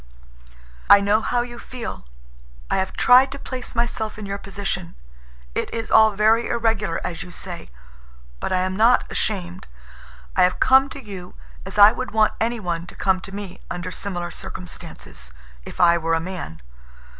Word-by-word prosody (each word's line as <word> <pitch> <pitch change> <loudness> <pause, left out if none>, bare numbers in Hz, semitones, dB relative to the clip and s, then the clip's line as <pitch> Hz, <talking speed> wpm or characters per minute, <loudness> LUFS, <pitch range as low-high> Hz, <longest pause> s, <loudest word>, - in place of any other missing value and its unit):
"I 200 0 +10
know 205 +2 +2
how 245 +2 0
you 240 -1 -9
feel. 230 - -7 0.6
I - - +2
have 190 0 -1
tried 255 +2 +6
to - - -7
place 255 -3 -7
myself 230 -2 -1
in 210 - -6
your 200 0 -4
position. 195 - -4 0.6
It - - -2
is 230 -1 -4
all 220 0 +7
very 220 +3 +3
irregular, 225 -6 0
as 170 -2 -4
you - - -8
say. - - -7 0.7
But - - -3
I 185 0 +2
am 185 0 -1
not 230 +4 +5
ashamed. 185 -4 -3 0.7
I - - +3
have 180 - +3
come 265 +1 +5
to - - -8
you 195 -7 -9 0.3
as 195 - -7
I 205 +1 +9
would 255 +2 -4
want 215 -1 +3
anyone 185 -8 -2
to - - -11
come 190 -2 +1
to 195 - -9
me 200 -2 -7
under 175 +1 -4
similar 175 -2 -4
circumstances, - - -7 0.3
if - - -10
I 170 -1 +5
were 165 0 +1
a - - +1
man. 165 - -7
200 Hz, 170 wpm, -22 LUFS, 180-225 Hz, 0.7 s, I